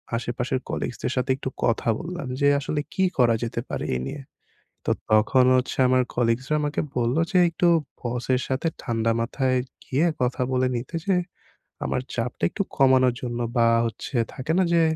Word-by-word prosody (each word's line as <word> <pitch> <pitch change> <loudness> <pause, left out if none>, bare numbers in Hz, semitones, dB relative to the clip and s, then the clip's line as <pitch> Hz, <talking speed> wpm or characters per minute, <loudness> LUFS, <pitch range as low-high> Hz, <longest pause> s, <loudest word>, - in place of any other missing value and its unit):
আশেপাশের 120 +2 -2
কলিগসদের 125 - -3
সাথে 130 +1 0
একটু 130 - -4
কথা 115 0 +1
বললাম 175 -5 -5
যে 140 - +4
"আসলে 145 +1 -2
কী 190 - +1
করা 120 -3 +4
যেতে 115 - -3
পারে - - -3
এই 65 - -2
নিয়ে?" 145 - -6 0.6
তো - - +2 0.2
তখন 120 +4 +5
হচ্ছে 125 - -2
আমার 130 0 +4
কলিগসরা 120 +5 +1
আমাকে 150 0 -1 0.2
বললো 120 +7 +2
যে 185 - +3
একটু 175 +1 +1 0.3
বসের 125 +1 -1
সাথে 135 +5 -1
ঠান্ডা 115 -1 0
মাথায় 130 +2 0 0.3
গিয়ে 140 +6 +1 0.2
কথা 125 +1 0
বলে 130 0 +2
নিতে 125 +8 -5
যে 195 -2 +3 0.7
আমার - - -1
চাপটা 120 +1 -2
একটু 200 - -1
কমানোর 130 -2 +5
জন্য 120 -1 -3 0.2
বা 115 0 +5 0.2
হচ্ছে 115 +4 -5 0.2
থাকে 135 +5 -2
না 190 - +5
যে 170 - +5
130 Hz, 170 wpm, -24 LUFS, 120-140 Hz, 0.7 s, তখন